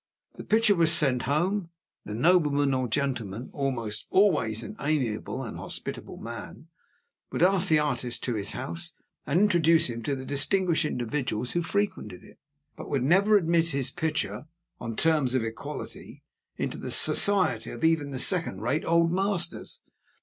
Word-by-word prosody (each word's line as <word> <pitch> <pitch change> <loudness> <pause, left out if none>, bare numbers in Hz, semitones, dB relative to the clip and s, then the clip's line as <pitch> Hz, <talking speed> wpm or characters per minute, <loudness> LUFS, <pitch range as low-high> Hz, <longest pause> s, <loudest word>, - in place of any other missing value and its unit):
The - - -10
picture 220 -1 +3
was 165 -4 +3
sent 135 -7 +3
home; 175 +5 0 0.4
the 105 - -6
nobleman 145 -1 +2
or 130 -1 -1
gentleman 120 -4 -3
(almost 120 -7 -3
always 135 - +2
an 210 - -8
amiable 135 -3 -2
and 115 - -7
a - - -9
hospitable - - -5
man) - - -9 0.6
would - - 0
ask 190 0 +4
the 155 - +5
artist 125 -5 -2
to 125 - -1
his 105 -2 -2
house 165 +6 -4 0.3
and 150 +5 +2
introduce 170 -7 +3
him 115 0 -6
to 140 +5 -2
the 130 0 -7
distinguished 160 +5 +2
individuals 125 -3 -3
who 175 - 0
frequented 170 - -3
it; - - -18 0.4
but - - -9
would 135 -3 -1
never 195 +8 +4
admit 170 -2 +1
his 135 -4 -2
picture, 155 0 -3 0.3
on 115 -2 -5
terms 150 -3 +1
of 130 - +1
equality, 115 0 -8 0.3
into - - -4
the - - -6
society 200 -2 +4
even 160 -3 +2
of 140 - -8
the - - -4
second 165 - +2
rate 140 +7 -1
Old 170 0 +2
Masters. 190 -2 -1
150 Hz, 160 wpm, -26 LUFS, 125-170 Hz, 0.6 s, the